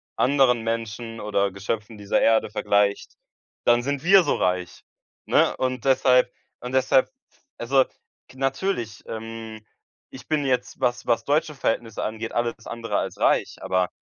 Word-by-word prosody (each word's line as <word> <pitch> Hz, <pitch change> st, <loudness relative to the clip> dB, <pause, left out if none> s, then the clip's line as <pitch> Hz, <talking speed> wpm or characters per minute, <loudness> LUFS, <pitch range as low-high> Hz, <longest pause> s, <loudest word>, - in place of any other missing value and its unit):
anderen 130 Hz, -3 st, +3 dB
Menschen 115 Hz, 0 st, -4 dB
oder 100 Hz, -1 st, 0 dB
Geschöpfen 105 Hz, +3 st, -4 dB
dieser 100 Hz, -1 st, 0 dB
Erde 110 Hz, -2 st, +3 dB
vergleicht, 100 Hz, -1 st, +1 dB, 0.5 s
dann 120 Hz, 0 st, +4 dB
sind 140 Hz, +2 st, -3 dB
wir 195 Hz, +1 st, +7 dB
so 145 Hz, -, +1 dB
reich, 90 Hz, -1 st, -1 dB, 0.4 s
ne? -, -, +3 dB
Und 130 Hz, -1 st, -2 dB
deshalb 125 Hz, -2 st, +4 dB, 0.3 s
und 125 Hz, +1 st, -7 dB
deshalb 130 Hz, 0 st, +3 dB
f -, -, -39 dB, 0.4 s
also, 130 Hz, +2 st, +3 dB, 0.4 s
k 130 Hz, -, -17 dB
natürlich, 135 Hz, -, -2 dB
ähm, 110 Hz, -1 st, -7 dB, 0.5 s
ich 130 Hz, -1 st, -12 dB
bin 150 Hz, -2 st, 0 dB
jetzt, 125 Hz, -2 st, -1 dB
was 125 Hz, -2 st, -1 dB
was 120 Hz, -1 st, +2 dB
deutsche 150 Hz, +1 st, 0 dB
Verhältnisse 115 Hz, -4 st, -2 dB
angeht, 110 Hz, +1 st, -4 dB
alles 120 Hz, -1 st, -2 dB
andere 115 Hz, -3 st, -3 dB
als -, -, -3 dB
reich. -, -, +2 dB
Aber 95 Hz, -1 st, 0 dB
115 Hz, 150 wpm, -24 LUFS, 110-130 Hz, 0.5 s, wir